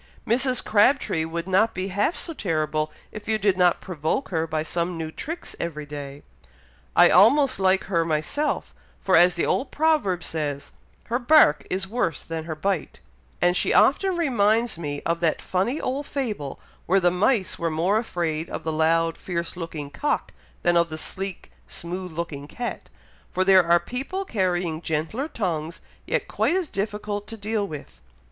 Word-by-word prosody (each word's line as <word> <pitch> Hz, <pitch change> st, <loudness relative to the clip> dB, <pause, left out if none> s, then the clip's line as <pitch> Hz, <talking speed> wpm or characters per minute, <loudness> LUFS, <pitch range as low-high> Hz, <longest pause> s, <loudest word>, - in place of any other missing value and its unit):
Mrs. 255 Hz, +2 st, +2 dB
Crabtree 210 Hz, -, +3 dB
would 170 Hz, +2 st, -4 dB
not 205 Hz, +4 st, +3 dB
be 185 Hz, +2 st, -3 dB
half 205 Hz, -, 0 dB
so 330 Hz, -, -4 dB
terrible 155 Hz, -, -1 dB, 0.2 s
if 210 Hz, -1 st, -9 dB
you 220 Hz, 0 st, +2 dB
did 200 Hz, -2 st, +2 dB
not 180 Hz, -1 st, +3 dB
provoke 170 Hz, -, -2 dB
her 165 Hz, -2 st, -1 dB
by 155 Hz, -1 st, -1 dB
some 170 Hz, +2 st, -2 dB
new 160 Hz, -1 st, -4 dB
tricks 330 Hz, -, -5 dB
every 155 Hz, -3 st, -4 dB
day. 145 Hz, -1 st, -8 dB, 0.7 s
I -, -, +7 dB
almost 260 Hz, +7 st, +5 dB
like 190 Hz, 0 st, +3 dB
her 170 Hz, -4 st, +1 dB
myself; 165 Hz, -, -1 dB, 0.3 s
for 190 Hz, -, +2 dB
as 175 Hz, +1 st, +6 dB
the 170 Hz, -, 0 dB
old 260 Hz, -, 0 dB
proverb 295 Hz, -, +1 dB
says, 145 Hz, -3 st, -3 dB, 0.3 s
'her 240 Hz, +2 st, -1 dB
bark 260 Hz, -, +5 dB
is 190 Hz, +1 st, -2 dB
worse 205 Hz, -7 st, -1 dB
than 160 Hz, -1 st, -5 dB
her 160 Hz, -1 st, -4 dB
bite;' 185 Hz, +1 st, -2 dB, 0.4 s
and 175 Hz, 0 st, +4 dB
she -, -, +2 dB
often 370 Hz, +6 st, +4 dB
reminds 230 Hz, -6 st, +2 dB
me 145 Hz, -4 st, -5 dB
of 170 Hz, 0 st, 0 dB
that 165 Hz, -2 st, +1 dB
funny 215 Hz, +11 st, -1 dB
old 275 Hz, +3 st, -3 dB
fable, 210 Hz, -, -4 dB, 0.3 s
where 195 Hz, +3 st, +4 dB
the 175 Hz, -1 st, +3 dB
mice 195 Hz, +3 st, +1 dB
were 170 Hz, -, 0 dB
more 175 Hz, +7 st, +1 dB
afraid 170 Hz, -6 st, -2 dB
of -, -, -5 dB
the 160 Hz, -, -2 dB
loud, 165 Hz, +1 st, +2 dB
fierce 170 Hz, -2 st, -4 dB
looking 160 Hz, -4 st, -6 dB
cock, 295 Hz, -, -1 dB, 0.3 s
than 175 Hz, 0 st, +3 dB
of 170 Hz, 0 st, +3 dB
the 155 Hz, -, -5 dB
sleek, 195 Hz, +4 st, -5 dB, 0.2 s
smooth 180 Hz, +1 st, -6 dB
looking 155 Hz, -3 st, -5 dB
cat, 240 Hz, +9 st, -6 dB, 0.4 s
for 185 Hz, -, 0 dB
there 190 Hz, -1 st, +7 dB
are 170 Hz, 0 st, +4 dB
people 270 Hz, -, -4 dB
carrying 180 Hz, -, -1 dB
gentler 160 Hz, -, -2 dB
tongues 170 Hz, -, -3 dB, 0.3 s
yet -, -, -1 dB
quite 345 Hz, -, +1 dB
as 375 Hz, -3 st, 0 dB
difficult 205 Hz, 0 st, -3 dB
to 225 Hz, -, -8 dB
deal 210 Hz, 0 st, -1 dB
with. 140 Hz, -, -9 dB
180 Hz, 170 wpm, -24 LUFS, 160-220 Hz, 0.7 s, I